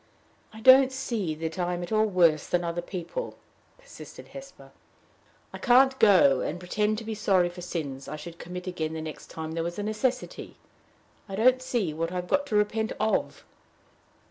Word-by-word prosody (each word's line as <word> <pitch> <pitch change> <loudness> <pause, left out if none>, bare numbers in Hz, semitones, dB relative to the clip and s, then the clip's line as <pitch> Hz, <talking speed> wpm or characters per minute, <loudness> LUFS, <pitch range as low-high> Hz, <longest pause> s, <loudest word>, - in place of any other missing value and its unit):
"I 220 0 -12
don't 260 +2 +7
see 230 -11 -3
that 160 +2 -5
I'm 175 0 -1
at 175 - -8
all 215 0 +3
worse 170 -6 +3
than 175 0 0
other 170 0 -2
people," 185 - -6 0.4
persisted - - -13
Hesper. - - -12 0.8
"I - - -7
can't 265 +1 +4
go 180 -11 +6
and 175 - -3
pretend 210 +4 -1
to 225 - -6
be 225 0 -4
sorry 195 -4 +2
for 175 +1 -10
sins 145 -6 -5
I - - -5
should 165 +3 -10
commit 180 +1 -7
again 160 -4 -3
the 160 - -4
next 155 -1 -8
time 160 0 -6
there 165 0 -2
was 170 +1 -4
a 205 - -3
necessity. 245 +4 -3 0.7
I 195 - -4
don't 255 +5 +4
see 230 -10 -1
what 165 +2 -3
I've 180 -1 -4
got 285 +9 +1
to 220 - -2
repent 220 +1 +1
of." 215 +1 -1
185 Hz, 180 wpm, -27 LUFS, 170-225 Hz, 0.8 s, don't